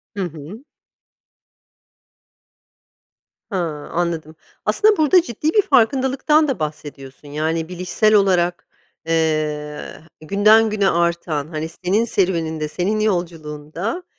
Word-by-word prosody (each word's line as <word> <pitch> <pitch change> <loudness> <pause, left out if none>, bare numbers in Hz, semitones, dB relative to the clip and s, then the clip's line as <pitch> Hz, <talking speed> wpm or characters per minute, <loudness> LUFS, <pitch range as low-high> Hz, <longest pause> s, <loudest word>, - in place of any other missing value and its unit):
Hı 195 - -2
hı. 170 - -8 2.9
Ha, 195 - -2 0.3
anladım. 165 -2 -2 0.3
Aslında 425 -1 +3
burada 315 +4 +5
ciddi 300 +1 -3
bir 420 - +5
farkındalıktan 275 - +2
da 260 -10 -2
bahsediyorsun, 145 -2 -7
yani, 160 +3 -2
bilişsel 180 +4 +1
olarak, 180 -3 +2 0.4
eee, 155 -2 -2 0.2
günden 215 +6 +4
güne 200 -2 +1
artan, 170 -4 -1
hani, 160 0 -5
senin 205 +6 +2
serüveninde, 165 -7 -1
senin 195 +7 -1
yolculuğunda, 175 - -3
175 Hz, 95 wpm, -20 LUFS, 155-215 Hz, 2.9 s, burada